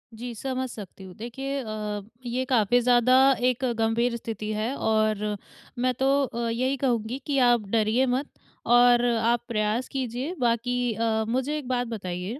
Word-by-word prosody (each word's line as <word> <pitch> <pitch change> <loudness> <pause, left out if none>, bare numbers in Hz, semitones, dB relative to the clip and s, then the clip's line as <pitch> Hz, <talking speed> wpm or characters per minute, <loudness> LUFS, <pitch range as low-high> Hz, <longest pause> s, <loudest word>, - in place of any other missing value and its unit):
जी 240 +1 -6
समझ 260 +2 -3
सकती 200 -4 -10
हूँ। 185 - -10
देखिये 270 +5 -4
अ, 210 -2 -4 0.2
ये 245 +2 -1
काफ़ी 240 -1 +3
ज़्यादा 245 +1 +4 0.3
एक 255 +1 0
गंभीर 230 +2 +1
स्थिति 215 -2 -5
है 220 +5 -2
और 215 -3 0 0.4
मैं 255 +1 +1
तो 270 +1 +3
अ, 235 -2 -3
यही 255 +4 0
कहूँगी 245 -2 -1
कि 280 -1 0
आप 240 -4 +2
डरिए 225 +4 +2
मत 260 +3 -1 0.4
और 245 0 +5
आप 235 0 +1
प्रयास 220 +2 -1
कीजिये 260 +4 -3
बाकी 245 0 0
अ, 220 0 0
मुझे 265 +5 -1
एक 285 -5 -7
बात 245 -1 -1
बताइये 195 +2 -5
235 Hz, 160 wpm, -26 LUFS, 220-255 Hz, 0.4 s, और